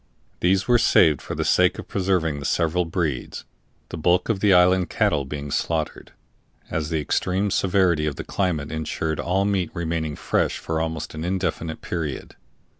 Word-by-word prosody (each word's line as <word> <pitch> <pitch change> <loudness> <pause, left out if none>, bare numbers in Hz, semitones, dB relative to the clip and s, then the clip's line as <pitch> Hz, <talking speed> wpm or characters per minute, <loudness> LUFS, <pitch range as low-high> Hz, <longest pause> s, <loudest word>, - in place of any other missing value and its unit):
These 95 +3 +2
were 120 -1 +5
saved 80 - +4
for - - -6
the - - -2
sake - - +3
of - - -8
preserving 90 -6 0
the 70 - -7
several 85 +4 +1
breeds, 80 -6 -3 0.4
the 80 - -6
bulk 90 +5 +2
of 110 -4 +1
the 105 0 +3
island 90 0 +4
cattle 70 -2 +1
being 70 +1 -6
slaughtered, 80 +1 -2 0.6
as 80 -1 -2
the 80 -2 0
extreme 95 +6 0
severity 90 -5 +2
of 75 - -2
the - - -6
climate 80 -7 -2
insured 80 0 -3
all 95 +3 +1
meat 95 -4 0
remaining 80 -3 -2
fresh - - 0
for 80 0 -2
almost 80 -1 -4
an 80 0 -5
indefinite 90 -3 -2
period. 80 -6 -4
85 Hz, 170 wpm, -23 LUFS, 80-95 Hz, 0.6 s, were